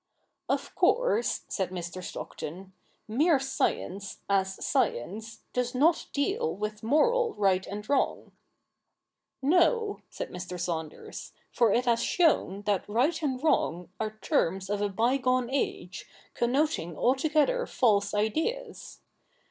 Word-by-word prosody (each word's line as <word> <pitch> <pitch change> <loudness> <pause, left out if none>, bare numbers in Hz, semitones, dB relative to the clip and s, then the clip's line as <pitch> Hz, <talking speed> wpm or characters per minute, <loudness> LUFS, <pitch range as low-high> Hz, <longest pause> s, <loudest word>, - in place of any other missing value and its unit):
' - - -51
Of - - -1
course,' - - +2
said 190 -3 -2
Mr. 180 0 -6
Stockton, 185 +3 -7 0.2
' - - -40
mere 290 +8 +3
science, 200 -7 -2
as 190 -1 0
science, 220 - -1
does 250 0 -1
not 320 +6 +3
deal 405 - -1
^^dth 210 +1 -4
moral 460 - +2
right 190 -2 +2
and 210 +1 -6
wrong.' 280 -1 0 1.1
'No,' 405 - +3
said - - -6
Mr. 180 0 -6
Saunders, 160 -3 -5 0.2
'for 235 -4 +3
it 245 +5 +2
has 235 -1 +2
shown 280 - +2
that 205 -1 -1
right 275 +10 +1
and 265 -3 -2
wrong 180 - +1
are 215 0 -3
terms 195 - 0
of 205 0 -1
a 205 - +1
bygone 250 +4 +1
age, 190 -9 -3 0.3
connoting 245 - 0
altogether 305 - +2
false 205 -4 +2
ideas. 320 - -2
230 Hz, 125 wpm, -28 LUFS, 195-300 Hz, 1.1 s, mere